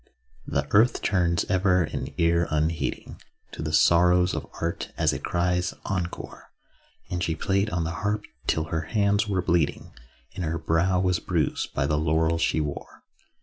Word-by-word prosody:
The 70 Hz, +1 st, -1 dB
earth 110 Hz, +4 st, +4 dB
turns 85 Hz, -4 st, +1 dB
ever 95 Hz, -1 st, +2 dB
an 75 Hz, -, -4 dB
ear 85 Hz, 0 st, +2 dB
unheeding 75 Hz, 0 st, -2 dB, 0.3 s
To -, -, -7 dB
the 75 Hz, 0 st, -3 dB
sorrows 90 Hz, +3 st, +4 dB
of -, -, -4 dB
art, 85 Hz, 0 st, -3 dB
as -, -, +2 dB
it -, -, -5 dB
cries 90 Hz, 0 st, 0 dB
'encore.' 90 Hz, -3 st, -5 dB, 0.6 s
And 90 Hz, 0 st, -1 dB
she 80 Hz, -, -1 dB
played 100 Hz, +6 st, 0 dB
on 90 Hz, -4 st, -1 dB
the 80 Hz, -, -2 dB
harp 105 Hz, 0 st, -1 dB, 0.2 s
till 80 Hz, -, +1 dB
her 80 Hz, -, +1 dB, 0.2 s
hands 100 Hz, +1 st, +2 dB
were 95 Hz, -3 st, 0 dB
bleeding, 85 Hz, -4 st, 0 dB, 0.4 s
And 90 Hz, -, -4 dB
her 85 Hz, 0 st, -1 dB
brow 85 Hz, +3 st, +1 dB
was 90 Hz, -2 st, +1 dB
bruised -, -, -2 dB
by 70 Hz, -, +1 dB
the 75 Hz, +1 st, +1 dB
laurels 80 Hz, +1 st, +1 dB
she 80 Hz, -, +1 dB
wore. 75 Hz, -2 st, -5 dB
85 Hz, 165 wpm, -26 LUFS, 80-95 Hz, 0.6 s, earth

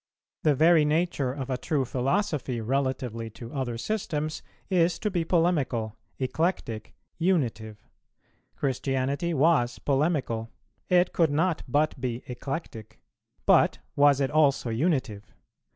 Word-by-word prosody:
The 150 Hz, -2 st, +3 dB
very 160 Hz, +2 st, +5 dB
nature 150 Hz, -3 st, 0 dB
of 135 Hz, -1 st, -5 dB
a 130 Hz, -, -1 dB
true 140 Hz, 0 st, 0 dB
philosophy 135 Hz, -, -1 dB
relatively 125 Hz, -2 st, -2 dB
to 115 Hz, 0 st, -9 dB
other 130 Hz, -4 st, -2 dB
systems 155 Hz, -, -3 dB, 0.3 s
is 175 Hz, -2 st, +2 dB
to 210 Hz, -, -2 dB
be 175 Hz, -3 st, 0 dB
polemical, 150 Hz, -, +1 dB, 0.2 s
eclectic, 130 Hz, -, -2 dB, 0.2 s
unitive: 120 Hz, -, 0 dB, 0.8 s
Christianity 135 Hz, +4 st, -1 dB
was 140 Hz, -5 st, +3 dB
polemical; 135 Hz, -6 st, 0 dB, 0.4 s
it 180 Hz, 0 st, +3 dB
could 165 Hz, -3 st, +3 dB
not 160 Hz, +3 st, +1 dB
but 145 Hz, +1 st, 0 dB
be 120 Hz, -1 st, -3 dB
eclectic; 125 Hz, -3 st, -6 dB, 0.5 s
but -, -, +4 dB, 0.2 s
was 145 Hz, -1 st, +5 dB
it 135 Hz, -1 st, 0 dB
also 140 Hz, -6 st, +2 dB
unitive? 125 Hz, -, -1 dB
140 Hz, 120 wpm, -27 LUFS, 125-165 Hz, 0.8 s, very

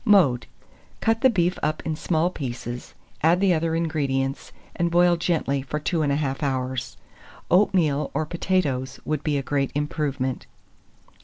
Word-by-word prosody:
Mode. 175 Hz, -, +4 dB, 0.5 s
Cut 225 Hz, 0 st, +1 dB
the 260 Hz, -, +6 dB
beef 180 Hz, -5 st, +1 dB
up 155 Hz, +1 st, -1 dB
in 160 Hz, -, -1 dB
small 165 Hz, +2 st, 0 dB
pieces, 120 Hz, -5 st, -6 dB, 0.3 s
add 165 Hz, +3 st, +4 dB
the 195 Hz, -2 st, +4 dB
other 165 Hz, 0 st, 0 dB
ingredients, 140 Hz, -5 st, -1 dB, 0.2 s
and 170 Hz, 0 st, +1 dB
boil 175 Hz, +1 st, +4 dB
gently 160 Hz, -5 st, 0 dB
for 145 Hz, +3 st, -4 dB
21/2 145 Hz, -2 st, 0 dB
hours. 130 Hz, -3 st, -2 dB, 0.5 s
Oatmeal 170 Hz, -6 st, +3 dB
or 155 Hz, +2 st, +1 dB
potatoes 145 Hz, -7 st, -1 dB
would 155 Hz, -1 st, -2 dB
be 150 Hz, -2 st, +1 dB
a 140 Hz, -, -2 dB
great 140 Hz, 0 st, 0 dB
improvement. 145 Hz, -3 st, -2 dB
150 Hz, 140 wpm, -24 LUFS, 135-170 Hz, 0.5 s, the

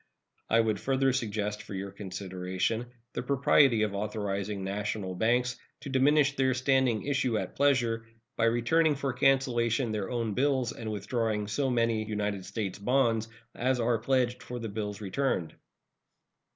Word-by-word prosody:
I 115 Hz, -, +4 dB
would 110 Hz, -2 st, 0 dB
further 135 Hz, 0 st, +1 dB
suggest 105 Hz, -4 st, -2 dB
for 105 Hz, -, -8 dB
your 100 Hz, +1 st, -5 dB
consideration 95 Hz, +3 st, -3 dB, 0.3 s
the -, -, -2 dB
propriety 140 Hz, -4 st, +4 dB
of 105 Hz, -2 st, -1 dB
authorizing 100 Hz, -1 st, -3 dB
national 100 Hz, 0 st, -3 dB
banks 120 Hz, +6 st, +1 dB, 0.2 s
to 140 Hz, -, -7 dB
diminish 140 Hz, +1 st, +4 dB
their 130 Hz, -1 st, +2 dB
standing 130 Hz, -3 st, +2 dB
issue 130 Hz, -5 st, +1 dB
at -, -, -4 dB
pleasure, 120 Hz, -5 st, +2 dB, 0.3 s
by 115 Hz, -, +2 dB
returning 145 Hz, +7 st, +3 dB
for 135 Hz, -1 st, -2 dB
cancellation 125 Hz, -2 st, +2 dB
their 105 Hz, -3 st, -2 dB
own 115 Hz, -4 st, -1 dB
bills 130 Hz, -1 st, +1 dB
and 110 Hz, -1 st, -6 dB
withdrawing 105 Hz, 0 st, -1 dB
so 135 Hz, +6 st, 0 dB
many 115 Hz, -3 st, +1 dB
United 105 Hz, -3 st, -3 dB
States 100 Hz, -4 st, -4 dB
bonds 115 Hz, -1 st, +2 dB, 0.3 s
as 130 Hz, +1 st, 0 dB
are 115 Hz, -1 st, +1 dB
pledged 125 Hz, 0 st, +1 dB
for 125 Hz, -, -6 dB
the 115 Hz, -2 st, -5 dB
bills 105 Hz, 0 st, -4 dB
returned. 100 Hz, -, -1 dB
115 Hz, 150 wpm, -29 LUFS, 105-130 Hz, 0.3 s, I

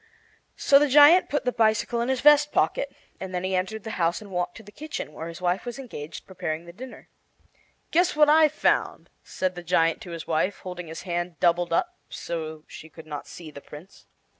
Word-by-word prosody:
So 275 Hz, -, +5 dB
the 295 Hz, -, +3 dB
giant 295 Hz, +6 st, +7 dB
put 290 Hz, -2 st, -1 dB
the 250 Hz, -, +1 dB
bicycle 230 Hz, +1 st, +1 dB
in 240 Hz, -, -1 dB
his 265 Hz, -1 st, 0 dB
vest 295 Hz, 0 st, +6 dB
pocket, -, -, 0 dB, 0.3 s
and 190 Hz, -1 st, -6 dB
then 180 Hz, -, -2 dB
he 190 Hz, 0 st, -2 dB
entered 200 Hz, +4 st, -2 dB
the 220 Hz, -, -6 dB
house 170 Hz, +1 st, +1 dB
and 205 Hz, -2 st, -13 dB
walked 180 Hz, -1 st, -3 dB
to 225 Hz, -, -12 dB
the 205 Hz, -, -14 dB
kitchen, 300 Hz, -, -7 dB
where 160 Hz, +2 st, -7 dB
his 170 Hz, +2 st, -9 dB
wife 180 Hz, +2 st, 0 dB
was 240 Hz, -1 st, -6 dB
engaged 170 Hz, -, -8 dB
preparing 165 Hz, -3 st, -5 dB
the 170 Hz, -, -12 dB
dinner. 250 Hz, +6 st, -11 dB, 0.8 s
"Guess 350 Hz, +1 st, +2 dB
what 300 Hz, 0 st, +5 dB
I've 310 Hz, 0 st, +5 dB
found," 305 Hz, -, 0 dB
said 185 Hz, -1 st, -2 dB
the 175 Hz, -, -8 dB
giant 165 Hz, +1 st, +1 dB
to 190 Hz, -, -10 dB
his 165 Hz, -2 st, -7 dB
wife, 170 Hz, +5 st, 0 dB
holding 180 Hz, -2 st, -7 dB
his 160 Hz, 0 st, -8 dB
hand 175 Hz, -3 st, -4 dB
doubled 175 Hz, 0 st, +2 dB
up 355 Hz, -, -1 dB
so 160 Hz, -2 st, -6 dB
she 160 Hz, -, -12 dB
could 160 Hz, 0 st, -13 dB
not 150 Hz, -2 st, -7 dB
see 165 Hz, -3 st, -10 dB
the 140 Hz, -, -11 dB
Prince. 150 Hz, +8 st, -14 dB
185 Hz, 215 wpm, -25 LUFS, 170-260 Hz, 0.8 s, giant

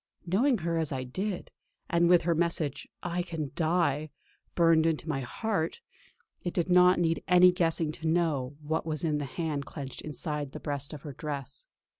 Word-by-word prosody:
Knowing 230 Hz, +9 st, +3 dB
her 165 Hz, -2 st, -1 dB
as 160 Hz, -2 st, 0 dB
I 130 Hz, -2 st, -2 dB
did, 185 Hz, +9 st, -4 dB, 0.4 s
and 170 Hz, 0 st, +3 dB
with 175 Hz, -1 st, +6 dB
her 170 Hz, +1 st, +2 dB
message 165 Hz, -4 st, -1 dB, 0.2 s
"I 175 Hz, 0 st, -1 dB
can 165 Hz, -6 st, -4 dB
die" 155 Hz, -2 st, +1 dB, 0.5 s
burned 165 Hz, -2 st, +5 dB
into 160 Hz, 0 st, -1 dB
my 150 Hz, -4 st, -1 dB
heart, 165 Hz, -, -2 dB, 0.6 s
it 175 Hz, -, -3 dB
did 175 Hz, 0 st, 0 dB
not 180 Hz, 0 st, +6 dB
need 165 Hz, -1 st, +1 dB
any 180 Hz, 0 st, +7 dB
guessing 165 Hz, -3 st, +1 dB
to 160 Hz, +1 st, -5 dB
know 155 Hz, -5 st, +1 dB
what 160 Hz, +2 st, -1 dB
was 155 Hz, -1 st, -3 dB
in 150 Hz, -3 st, +1 dB
the 145 Hz, -, -3 dB
hand 150 Hz, 0 st, -3 dB
clenched 135 Hz, -4 st, -7 dB
inside 150 Hz, -1 st, -4 dB
the -, -, -6 dB
breast 145 Hz, -2 st, -3 dB
of 150 Hz, -3 st, -9 dB
her 145 Hz, -, -7 dB
dress. 145 Hz, -, -6 dB
160 Hz, 180 wpm, -29 LUFS, 145-175 Hz, 0.6 s, any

